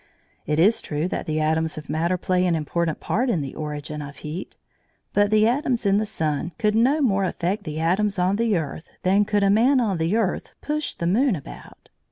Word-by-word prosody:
It 150 +1 +1
is 205 +7 +4
true 150 +3 -2
that - - -4
the 155 0 0
atoms 160 +1 0
of 150 - -8
matter 170 +3 0
play 180 0 +1
an 170 - +2
important 160 +1 -1
part 245 +5 0
in 175 -10 +1
the 135 -2 -5
origin 150 0 -5
of 145 0 -8
heat, 155 +7 -7 0.6
but 205 0 +3
the 215 +1 +4
atoms 245 -2 0
in 200 0 +4
the 215 +1 0
sun 160 -4 -2
could 210 -1 +1
no 260 +8 +3
more 200 -6 +2
affect 190 +2 -2
the 155 -1 -4
atoms 195 +5 +1
on 185 +2 +1
the 225 -4 +2
earth 160 0 -5
than 195 +3 +3
could 205 -1 +1
a 195 - +4
man 250 +6 +4
on 205 -8 0
the 165 +6 +1
earth 220 -5 -1
push 300 0 -3
the 170 - -4
moon 225 +6 +3
about. 140 - -11
185 Hz, 215 wpm, -23 LUFS, 160-215 Hz, 0.6 s, is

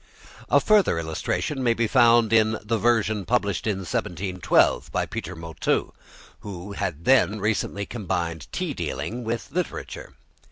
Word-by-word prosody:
A - - +5
further 210 - +3
illustration 85 - -2
may 120 -2 +2
be 115 - +1
found 115 -1 +4
in 110 0 +4
the 110 +1 -1
version 110 -2 +2
published 100 -2 0
in 105 -3 0
1712 90 +1 0
by - - 0
Peter 90 - -6
Motteux, 80 -1 -2 0.5
who 100 -1 -8
had 90 -5 -4
then 120 -5 +4
recently 100 -1 -1
combined 90 -8 -3
tea - - -2
dealing 120 +2 -4
with 115 +4 -4
literature. 180 +3 -5
105 Hz, 135 wpm, -24 LUFS, 90-115 Hz, 0.5 s, A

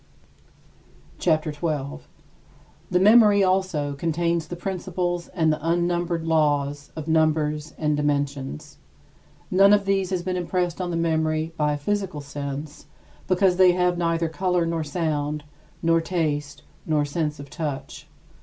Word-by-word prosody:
CHAPTER 155 -2 +1
XII 145 - -17
19. 150 -3 -2 0.9
The 180 - +2
memory 210 0 +6
also 185 -6 0
contains 170 +2 -1
the 175 - -5
principles 175 -1 -3
and 160 -4 +1
the - - -4
unnumbered 170 0 0
laws 145 -3 +1
of 155 -1 -6
numbers 155 -1 +1
and 150 -1 +1
dimensions. 145 0 -2 0.7
None 195 +2 +6
of 205 -1 +3
these 195 -1 +1
has 185 -2 -2
been 185 0 -2
impressed 180 0 -1
on 180 - -2
the 170 - -2
memory 160 -1 0
by 150 -1 +1
a - - -2
physical 190 +1 -2
sense, 145 +1 -6 0.4
because 185 -1 +3
they 185 -1 +6
have 180 0 +2
neither 165 -1 0
color 180 +1 0
nor 165 -1 -1
sound, 150 -1 -2 0.4
nor 165 0 +3
taste, 150 -4 -2 0.2
nor 150 -2 +2
sense 150 0 -2
of 140 0 -10
touch. 150 -5 -5
165 Hz, 140 wpm, -24 LUFS, 150-180 Hz, 0.9 s, memory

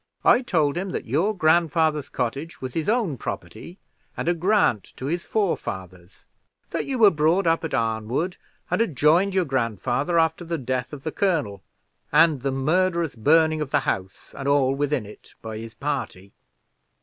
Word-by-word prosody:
I 245 - +6
told 160 - +1
him 190 +2 -3
that - - -3
your 170 - 0
grandfather's 160 -2 +2
cottage 135 +7 -4
was 130 -1 -6
his 165 +3 -1
own 210 - 0
property, 175 +3 -7 0.4
and - - -3
a 175 - +4
grant 175 - +2
to 130 - -6
his 170 +5 -2
forefathers; 95 - -3 0.5
that - - -2
you 270 -2 -2
were 215 -4 +7
brought 165 +4 +2
up 165 0 +2
at 160 - -2
Arnwood, 115 - -1 0.3
and - - +2
had 185 -11 -1
joined 170 +8 +3
your 185 -2 +2
grandfather 130 - -1
after 160 +1 +2
the 170 0 -3
death 130 -2 -3
of 145 -2 -9
the 160 - -3
colonel, 150 - -1 0.5
and 155 -2 +4
the 135 +1 -1
murderous 170 +3 0
burning 155 +6 +3
of 150 - -3
the - - +2
house 95 0 -4
and 135 - -5
all 140 -2 +3
within 140 -3 -1
it 105 - -14
by 110 -1 -7
his 115 0 -9
party. 135 -9 -4
150 Hz, 175 wpm, -24 LUFS, 130-170 Hz, 0.5 s, were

